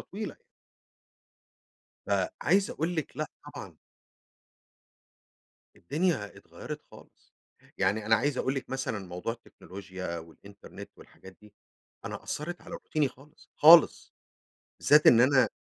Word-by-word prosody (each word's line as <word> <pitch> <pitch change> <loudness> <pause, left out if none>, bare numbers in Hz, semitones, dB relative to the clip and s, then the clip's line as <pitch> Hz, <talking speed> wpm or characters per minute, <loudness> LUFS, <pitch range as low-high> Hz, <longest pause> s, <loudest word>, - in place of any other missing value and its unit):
طويلة. 210 +2 -7 1.7
فعايز 195 0 +1
قول 170 +3 -3
لِك 160 -4 -4
لأ - - -2 0.3
طبعًا. - - -9 2.0
الدنيا 150 - -2
اتغيّرت - - -9
خالص، - - -19 0.4
يعني 105 +1 0
أنا 110 +1 +4
عايز 140 +4 -1
أقول 130 - -1
لِك 130 -2 -5
مثلًا 130 -5 -3
موضوع 90 +6 -4
التكنولوجيا 95 -5 -9
والإنترنت 85 +5 -12
والحاجات 95 0 -16
دي، 105 -1 -18 0.5
أنا - - -6
أثّرت 175 +4 -5
على - - -13
روتيني 155 -3 -1
خالص، 135 +3 -18
خالص، 165 +1 +6 0.7
بالذات 150 +1 +5
إن 115 - +7
أنا 130 +1 +4
130 Hz, 110 wpm, -28 LUFS, 100-155 Hz, 2.0 s, إن